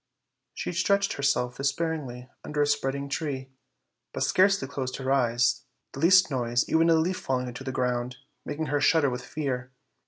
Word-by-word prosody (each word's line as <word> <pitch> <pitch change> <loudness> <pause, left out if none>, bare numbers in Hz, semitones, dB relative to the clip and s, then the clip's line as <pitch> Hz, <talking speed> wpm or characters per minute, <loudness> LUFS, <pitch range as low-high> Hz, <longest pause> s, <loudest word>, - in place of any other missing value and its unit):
She - - -3
stretched 200 +3 +1
herself 125 -3 0
despairingly 140 -3 -2 0.2
under 150 -1 0
a - - +3
spreading 140 -1 -1
tree, 140 -2 -4 0.6
but - - -1
scarcely 190 -6 +3
closed 130 -2 -4
her 135 0 -3
eyes; 120 -2 +2 0.3
the - - -7
least 185 +1 +5
noise, 120 -2 0
even 165 +1 +3
a 165 - +6
leaf 175 +3 +1
falling 130 -1 -1
on 125 - -6
the 135 +2 -5
ground, 125 -1 -2 0.3
making 150 +2 -4
her 145 0 -1
shudder 145 -3 +3
with 125 0 -5
fear. 130 -4 -4
140 Hz, 165 wpm, -27 LUFS, 125-160 Hz, 0.6 s, a